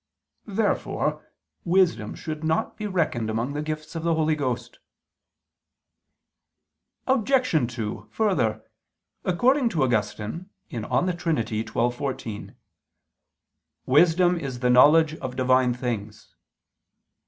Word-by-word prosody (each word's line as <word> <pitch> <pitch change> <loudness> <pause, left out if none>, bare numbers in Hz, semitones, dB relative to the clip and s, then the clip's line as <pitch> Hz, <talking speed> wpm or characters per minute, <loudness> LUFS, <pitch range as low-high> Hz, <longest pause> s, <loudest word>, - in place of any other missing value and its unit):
Therefore 210 +1 -1 0.3
wisdom 180 0 +2
should 155 -1 -6
not 160 0 0
be 215 - -4
reckoned 155 - -1
among 115 +5 -2
the 145 - -2
gifts 155 0 -5
of 165 - -4
the 165 0 +1
Holy 160 0 +2
Ghost. 125 -5 -3 2.3
Obj. 255 - +2
2: 105 -2 -5
Further, 185 - 0 0.6
according 245 +8 +2
to 160 -9 0
Augustine 110 - -2 0.2
(De 150 +10 0
Trin. 165 -8 -1
xii, 110 -1 -2
14) 120 -2 -3 1.3
"wisdom 175 +5 +4
is 130 -5 -6
the 125 -1 +3
knowledge 155 +5 +6
of 130 -1 -6
Divine 130 -1 +3
things." 110 -4 -5
150 Hz, 105 wpm, -25 LUFS, 120-175 Hz, 2.3 s, knowledge